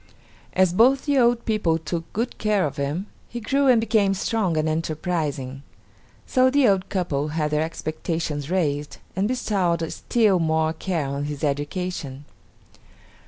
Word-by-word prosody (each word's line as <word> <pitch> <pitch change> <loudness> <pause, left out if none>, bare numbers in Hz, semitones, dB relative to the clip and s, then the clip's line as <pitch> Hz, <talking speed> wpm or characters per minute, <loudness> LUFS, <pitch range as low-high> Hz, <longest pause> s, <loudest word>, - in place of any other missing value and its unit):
As 185 -2 +3
both 255 +7 +4
the 285 -2 +3
old 235 -1 +3
people 210 -7 +1
took 165 +1 -5
good 235 +4 -3
care 210 -4 +2
of 140 -2 -4
him, 145 +7 -2 0.2
he 240 - -5
grew 275 +5 +1
and 250 -3 +6
became 215 -3 +2
strong 195 -4 0
and 155 0 +1
enterprising. 155 -4 -2 0.6
So 255 -1 +3
the 275 -1 +4
old 195 -2 +2
couple 155 -7 -1
had 150 -1 -1
their 150 0 +1
expectations 155 -2 -3
raised, 150 -5 -1 0.2
and 195 +3 +1
bestowed 185 -9 0
still 215 -6 +2
more 160 -1 +1
care 165 -2 -2
on 140 +1 -3
his 145 0 -5
education. 145 -1 -3
170 Hz, 150 wpm, -24 LUFS, 150-215 Hz, 0.6 s, and